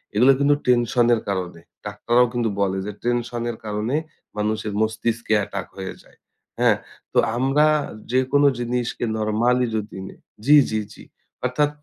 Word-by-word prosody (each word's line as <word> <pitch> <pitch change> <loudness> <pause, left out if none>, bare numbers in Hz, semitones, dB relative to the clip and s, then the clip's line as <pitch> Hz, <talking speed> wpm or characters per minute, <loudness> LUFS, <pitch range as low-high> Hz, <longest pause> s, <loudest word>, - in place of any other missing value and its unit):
এগুলো 125 +6 +6
কিন্তু 145 +1 +4
টেনশন 120 -1 +3
এর 115 - +1
কারণে। 90 -3 -3 0.3
ডাক্তাররাও 120 +4 +2
কিন্তু 120 -2 0
বলে 95 -1 +1
যে, 105 - -4
"টেনশন 120 0 -1
এর 115 - -9
কারণে 105 +5 -2 0.4
মানুষের 105 0 -1
মস্তিষ্কে 110 +1 -1
অ্যাটাক 100 -2 -4
হয়ে 95 -1 -5
যায়," - - -24 0.4
হ্যাঁ? - - +4 0.4
তো - - +4 0.2
আমরা 135 +4 +3 0.5
যেকোনো 130 +3 +3
জিনিসকে 120 0 -2
নরমালি 115 +4 +2
যদি 105 -2 -6
নেই - - -13 0.3
জি, 150 - +7
জি, 110 - 0
জি। - - -14 0.4
অর্থাৎ, 145 +4 +1
115 Hz, 145 wpm, -22 LUFS, 105-125 Hz, 0.5 s, জি